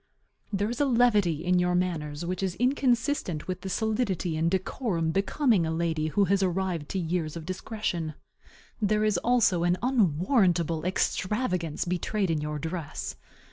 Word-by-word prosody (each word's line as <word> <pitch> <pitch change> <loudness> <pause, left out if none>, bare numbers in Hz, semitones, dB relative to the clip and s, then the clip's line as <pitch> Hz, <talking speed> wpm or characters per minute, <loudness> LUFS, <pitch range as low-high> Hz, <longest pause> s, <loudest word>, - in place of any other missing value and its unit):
There 205 +2 0
is 245 - -3
a - - +4
levity 210 - +3
in 180 0 +3
your 180 0 +2
manners 165 -4 -2
which 185 +2 -3
is 185 -2 -1
inconsistent 245 - 0
with 185 - -4
the 195 - -5
solidity 210 -5 -1
and 160 +1 +1
decorum 185 -2 -1
becoming 200 - +2
a 160 - -1
lady 160 -1 0
who 200 +6 +2
has 195 +1 +2
arrived 180 -4 -1
to - - -2
years 170 -2 -2
of 160 - -8
discretion. 180 -4 -3 0.7
There 215 +1 +2
is 210 -4 +2
also 225 -8 +3
an 175 +1 +2
unwarrantable 180 - +2
extravagance 185 - -1
betrayed 180 +2 -1
in 155 -2 0
your 150 0 -3
dress. 160 -1 -5
180 Hz, 155 wpm, -27 LUFS, 165-210 Hz, 0.7 s, a